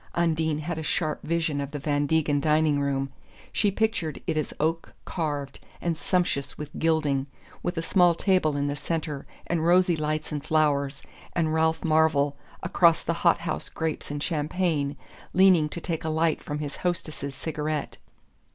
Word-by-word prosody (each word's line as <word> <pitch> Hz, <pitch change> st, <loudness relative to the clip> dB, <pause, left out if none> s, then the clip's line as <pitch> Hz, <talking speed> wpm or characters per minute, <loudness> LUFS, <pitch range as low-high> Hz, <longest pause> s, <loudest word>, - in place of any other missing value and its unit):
Undine 160 Hz, -2 st, +1 dB
had 160 Hz, +2 st, -3 dB
a -, -, -3 dB
sharp 155 Hz, 0 st, -1 dB
vision 160 Hz, -3 st, 0 dB
of 140 Hz, -, -4 dB
the 145 Hz, -, -5 dB
Van 145 Hz, 0 st, 0 dB
Degen 150 Hz, -2 st, +2 dB
dining 155 Hz, 0 st, +3 dB
room 135 Hz, -1 st, -1 dB, 0.4 s
she 210 Hz, -, +2 dB
pictured 200 Hz, -7 st, -1 dB
it -, -, -1 dB
as 155 Hz, -2 st, -1 dB
oak 165 Hz, +2 st, -1 dB
carved 145 Hz, -5 st, -3 dB, 0.2 s
and 170 Hz, -1 st, -1 dB
sumptuous 175 Hz, -5 st, -1 dB
with 150 Hz, -, -6 dB
gilding 150 Hz, -4 st, +1 dB, 0.3 s
with 175 Hz, 0 st, -3 dB
a 165 Hz, -, -1 dB
small 175 Hz, 0 st, +4 dB
table 175 Hz, -6 st, +2 dB
in 140 Hz, -, 0 dB
the 145 Hz, 0 st, -1 dB
centre, 150 Hz, -1 st, -3 dB, 0.2 s
and 165 Hz, -2 st, 0 dB
rosy 175 Hz, +1 st, +4 dB
lights 155 Hz, 0 st, -2 dB
and 145 Hz, -2 st, -3 dB
flowers, 145 Hz, -3 st, +1 dB, 0.3 s
and 160 Hz, -2 st, +1 dB
Ralph 160 Hz, 0 st, +2 dB
Marvell, 155 Hz, -3 st, +3 dB, 0.3 s
across 170 Hz, -2 st, +4 dB
the 170 Hz, -, 0 dB
hot 170 Hz, -1 st, +4 dB
house 170 Hz, -, -3 dB
grapes 160 Hz, -1 st, -3 dB
and 145 Hz, 0 st, -3 dB
champagne, 155 Hz, -3 st, 0 dB, 0.4 s
leaning 180 Hz, -5 st, +5 dB
to 170 Hz, -, -5 dB
take 165 Hz, -2 st, -3 dB
a 160 Hz, -, -1 dB
light 160 Hz, 0 st, +1 dB
from 145 Hz, -, -4 dB
his 145 Hz, -1 st, -5 dB
hostess's 155 Hz, -5 st, -3 dB
cigarette. 150 Hz, 0 st, -3 dB
155 Hz, 170 wpm, -26 LUFS, 145-165 Hz, 0.4 s, leaning